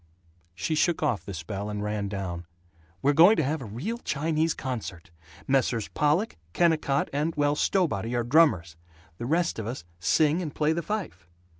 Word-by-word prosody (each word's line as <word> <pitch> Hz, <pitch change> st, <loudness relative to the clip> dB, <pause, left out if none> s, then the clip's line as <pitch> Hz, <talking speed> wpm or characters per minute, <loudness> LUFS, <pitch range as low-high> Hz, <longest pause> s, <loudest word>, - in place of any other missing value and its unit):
She 95 Hz, -, -2 dB
shook 160 Hz, +1 st, +1 dB
off 125 Hz, -9 st, 0 dB
the 100 Hz, -, -6 dB
spell 95 Hz, +6 st, -5 dB
and 105 Hz, 0 st, -3 dB
ran 105 Hz, -1 st, -2 dB
down. 90 Hz, -4 st, -5 dB, 0.6 s
"We're 145 Hz, +2 st, +4 dB
going 175 Hz, +9 st, +7 dB
to 160 Hz, -, +1 dB
have 150 Hz, +2 st, -1 dB
a -, -, -6 dB
real 145 Hz, -, -4 dB
Chinese 160 Hz, -, 0 dB
concert. 110 Hz, -10 st, -6 dB, 0.4 s
Messrs. 125 Hz, -5 st, +1 dB
Pollock, 150 Hz, +9 st, +1 dB, 0.2 s
Kennicott, 155 Hz, -5 st, +2 dB
and, 150 Hz, +3 st, -1 dB
well, 145 Hz, -1 st, +2 dB
Stowbody 135 Hz, -, 0 dB
are 120 Hz, -, +1 dB
drummers; 120 Hz, -, +3 dB, 0.4 s
the 120 Hz, -, -4 dB
rest 170 Hz, -2 st, +1 dB
of 110 Hz, -, -4 dB
us 120 Hz, -7 st, -5 dB
sing 155 Hz, -, +2 dB
and 155 Hz, -5 st, -5 dB
play 155 Hz, +1 st, +2 dB
the 170 Hz, -, -2 dB
fife." 200 Hz, -, -5 dB
140 Hz, 170 wpm, -27 LUFS, 105-160 Hz, 0.6 s, going